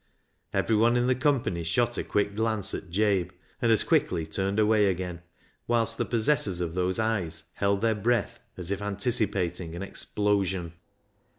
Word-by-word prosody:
Everyone 115 +2 +2
in 120 - +2
the 130 - +3
company 125 - 0
shot 120 +9 0
a - - -2
quick 100 0 -1
glance 110 -2 0
at 95 - -6
Jabe, 95 -1 +1 0.3
and 115 - +3
as 110 - +5
quickly 85 -3 +1
turned 95 +5 -2
away 105 -1 +4
again, 90 -2 -3 0.5
whilst 115 -1 +1
the - - +1
possessors 110 -5 +1
of 85 -2 -3
those 90 +1 0
eyes 100 -8 -1
held 100 0 0
their 115 -1 +3
breath 110 -1 0 0.2
as 90 0 -3
if 100 0 -2
anticipating 100 -5 -1
an 90 - -5
explosion. 95 -4 0
100 Hz, 160 wpm, -27 LUFS, 90-110 Hz, 0.5 s, as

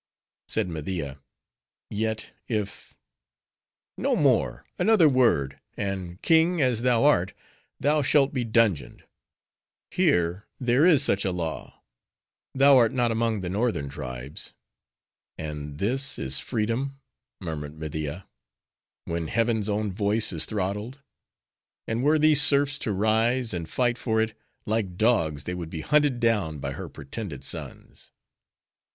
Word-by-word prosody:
Said - - +1
Media, 80 -4 -5 0.7
"Yet 110 +1 -2 0.2
if—" 105 -4 -4 1.0
"No - - +1
more! - - +1
another 195 -3 +5
word, 115 - +2 0.2
and, 95 -3 -4
king 165 +1 +4
as 125 -5 +2
thou 120 -1 +3
art, 95 -11 +3 0.5
thou 150 +2 +2
shalt 140 0 +3
be 130 -3 0
dungeoned:—here, 95 - -2
there 125 +4 +3
is 160 -7 +6
such 100 - +2
a 95 - 0
law; 85 -3 -5 0.7
thou 135 0 +6
art 115 -3 +4
not 120 -2 +1
among 115 -2 0
the 90 - -4
northern 100 - -1
tribes." 65 +1 -6 0.8
"And 75 -2 -6
this 130 - 0
is 65 0 0
freedom!" 125 +4 -2 0.4
murmured 80 -4 -6
Media; 80 +3 -5 0.8
"when 85 -1 -3
heaven's 110 +1 +1
own 105 0 -1
voice 105 +3 0
is - - +1
throttled. 105 +5 -3 0.9
And 115 +2 -1
were 150 +2 +4
these 155 -1 +5
serfs 140 0 +3
to 110 - -2
rise, 110 +4 +1
and 85 -2 -4
fight 120 -1 +1
for 110 -2 0
it; 110 0 0 0.3
like 105 -5 -1
dogs, 85 -11 +2
they 90 - -4
would 85 -2 -5
be 80 -2 -5
hunted 145 - +2
down 105 -10 +1
by 70 - -4
her - - -7
pretended 70 - -7
sons!" - - -7
110 Hz, 130 wpm, -26 LUFS, 85-125 Hz, 1.0 s, is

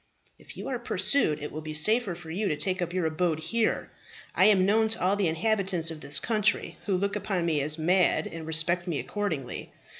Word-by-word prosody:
"If - - -14
you - - -6
are - - -2
pursued, 155 - +2
it 150 - -5
will 155 - -6
be 155 0 -6
safer 215 +4 +2
for 165 -2 -10
you 200 +5 -1
to 150 - -1
take 185 +5 -1
up 175 -1 -2
your 180 -2 -1
abode 160 0 0
here. 220 +8 -1 0.4
I - - +4
am 195 -3 +5
known 220 +3 +3
to 225 +1 0
all 185 +2 +2
the 200 -3 +1
inhabitants 180 -1 0
of 155 -2 -8
this 140 +1 -1
country, 215 -2 0
who 195 -2 +1
look 200 +2 -1
upon 195 -4 -2
me 155 -4 +1
as 150 +2 -1
mad, 180 +3 +2
and 165 -1 -7
respect 170 +3 +1
me 165 -4 -1
accordingly. 160 -12 -4
175 Hz, 215 wpm, -27 LUFS, 160-205 Hz, 0.4 s, am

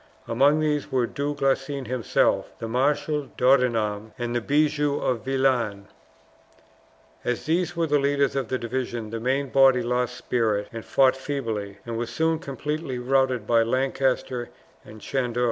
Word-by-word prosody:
Among 140 +6 +3
these 150 -1 -1
were 125 -2 +2
Du 145 +4 -3
Guesclin 135 0 -1
himself, 125 -1 0
the 115 - -5
Marshal 145 +4 0
D'Audenham, 115 -5 +2
and 120 0 -3
the 120 - +1
Bigue 145 +4 +2
de 145 -3 +1
Vilaines. 125 -5 0 1.3
As 125 -1 -2
these 175 +2 0
were 165 0 +1
the 150 -2 +2
leaders 140 -1 +1
of 135 -4 -1
the 130 - -1
division, 120 -2 -4
the 115 - -3
main 135 +4 0
body 135 -2 +5
lost 125 0 -1
spirit 110 -4 0
and 115 -1 -6
fought 130 -1 +3
feebly, 115 -8 -4
and 115 -1 -4
were 120 - -2
soon 160 +6 0
completely 150 -2 -4
routed 130 -2 +1
by 115 +1 +4
Lancaster 130 0 0 0.3
and 110 0 -13
Chandos. 125 -1 -2
130 Hz, 150 wpm, -25 LUFS, 120-140 Hz, 1.3 s, body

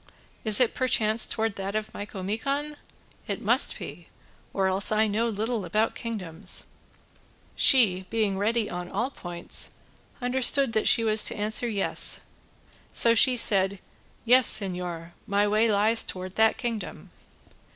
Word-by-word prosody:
Is 215 -2 +6
it 250 -3 +1
perchance 225 -3 +1
towards 220 -2 -3
that 195 +1 -6
of 215 0 -5
Micomicon? 225 +10 -5 0.5
It - - -6
must - - +2
be, - - -11 0.4
or 195 - -2
else 190 +2 +1
I 215 +1 +1
know 220 +3 -2
little 220 +1 -3
about 215 +6 -1
kingdoms." 190 -6 -3 0.9
She, 190 -8 +3
being 215 -3 -2
ready 220 +1 -1
on 180 0 -7
all 235 +7 -4
points, 175 -7 -2 0.5
understood 260 0 +3
that 220 - -1
she 230 - +3
was 215 -1 +4
to - - 0
answer 215 +3 +1
"Yes," 205 -4 +1 0.7
so 230 - +4
she 250 +2 +4
said 195 -3 +3 0.5
"Yes, 250 +1 +6
señor, 180 -4 -7 0.2
my 205 +1 0
way 215 +2 +1
lies 215 +3 +1
towards 185 0 -7
that 220 +1 +1
kingdom." 230 -4 -7
215 Hz, 140 wpm, -25 LUFS, 195-230 Hz, 0.9 s, Is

